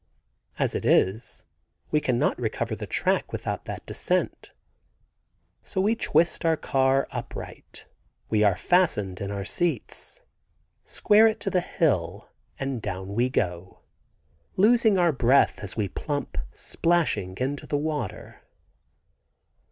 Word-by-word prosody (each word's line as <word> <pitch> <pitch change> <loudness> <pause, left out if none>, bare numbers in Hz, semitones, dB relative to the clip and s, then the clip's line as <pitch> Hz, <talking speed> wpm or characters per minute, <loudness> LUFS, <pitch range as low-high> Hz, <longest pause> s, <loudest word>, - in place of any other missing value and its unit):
As - - 0
it - - -3
is 100 +5 +1 0.5
we 150 - +3
cannot 125 -4 +1
recover - - -2
the - - -7
track - - 0
without - - -4
that - - -7
descent. - - -2 1.1
So - - -4
we 205 +4 +3
twist 165 -7 +1
our 165 -1 +3
car 135 -1 +2
upright - - -8 0.4
(we 110 -1 +1
are 100 -3 +4
fastened 105 - +1
in 100 - -3
our 100 -1 -4
seats), 175 - -3 0.6
square 215 +1 +4
it 220 - -1
to 195 - -2
the 180 - +2
hill 100 - -1 0.3
and 135 -3 -3
down 95 -1 -5
we 120 +4 +1
go, 90 -6 -3 0.8
losing 220 0 +5
our 175 -2 +4
breath 135 0 +3
as 100 - -5
we 105 -2 0
plump 145 - -4 0.2
splashing 165 - 0
into 135 +3 -3
the 145 - 0
water. 150 -7 -4
135 Hz, 130 wpm, -26 LUFS, -, 1.1 s, losing